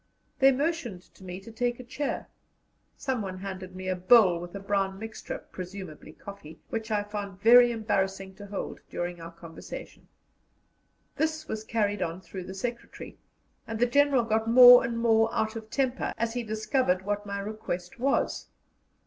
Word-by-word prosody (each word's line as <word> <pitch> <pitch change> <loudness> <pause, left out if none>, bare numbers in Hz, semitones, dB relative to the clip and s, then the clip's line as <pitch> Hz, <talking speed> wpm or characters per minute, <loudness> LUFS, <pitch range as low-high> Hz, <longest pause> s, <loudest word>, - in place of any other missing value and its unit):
They 270 0 +7
motioned 265 - -2
to - - -17
me 180 0 -6
to 230 - -11
take 240 +2 -1
a - - -7
chair; 275 +4 -4 0.7
someone 220 -9 -3
handed 185 -1 -7
me 185 0 -6
a 185 - 0
bowl 185 -1 +5
with 175 +2 -8
a - - -4
brown 195 -1 -1
mixture 220 +1 -6
presumably 185 -4 -8
coffee 195 -2 -11
which 225 0 -3
I 210 -1 +1
found 205 -2 -6
very 240 +3 +7
embarrassing 195 -4 -1
to 205 - -10
hold 200 0 -5
during 175 -1 -4
our 165 - -7
conversation. 170 -1 -10 1.1
This 315 0 -1
was 215 0 -4
carried 205 -3 -1
on 170 0 -2
through 185 -1 -8
the 190 - -8
secretary, 240 +4 -6 0.5
and 225 - -4
the 240 - +3
General 280 0 +3
got 220 0 0
more 245 +1 +10
and 235 - -2
more 225 -1 +3
out 220 -1 -1
of 220 -1 -7
temper 260 0 -1
as 225 0 -1
he 245 - -2
discovered 215 -3 0
what 205 +1 -3
my 200 0 -3
request 200 -2 -5
was. 275 +3 0
215 Hz, 165 wpm, -28 LUFS, 190-235 Hz, 1.1 s, more